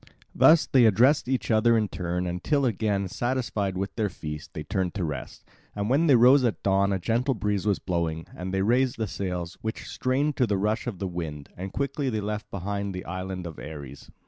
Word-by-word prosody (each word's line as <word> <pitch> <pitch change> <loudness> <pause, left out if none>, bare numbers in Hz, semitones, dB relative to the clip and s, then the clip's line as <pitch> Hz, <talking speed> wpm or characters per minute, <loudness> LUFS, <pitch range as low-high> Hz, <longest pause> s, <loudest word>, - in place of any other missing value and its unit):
Thus 160 0 +6
they 130 -3 +4
addressed 125 +7 +4
each 125 -5 -1
other 115 +1 +4
in 110 -1 +1
turn, 90 -1 -3
until 110 - 0
again, 105 -4 0
satisfied 110 -3 -2
with 100 +1 -3
their 110 -3 0
feast, 75 -4 -8
they 75 - -4
turned 90 +2 -2
to 95 - -1
rest. 75 -5 -5 0.3
And 105 +3 -1
when 155 +5 +3
they 140 - +7
rose 125 +3 +6
at 120 -3 -1
dawn 100 0 +3
a 95 - +1
gentle 120 +8 0
breeze 105 -1 -1
was 100 - +3
blowing; 85 -3 -2
and 90 +1 -5
they 95 0 0
raised 125 +4 +2
the 110 - -1
sails, 90 -3 -4
which 110 0 -4
strained 140 +3 0
to 125 - +3
the 100 -2 +1
rush 105 +5 -1
of 110 -6 -3
the 95 - -3
wind, 80 -5 -5
and 95 +2 -6
quickly 140 +2 -1
they 110 -3 -1
left 105 +1 -4
behind 100 0 -3
the 90 - -6
island 95 0 -5
of 80 -3 -7
Ares. 70 -3 -9
100 Hz, 210 wpm, -26 LUFS, 90-120 Hz, 0.3 s, they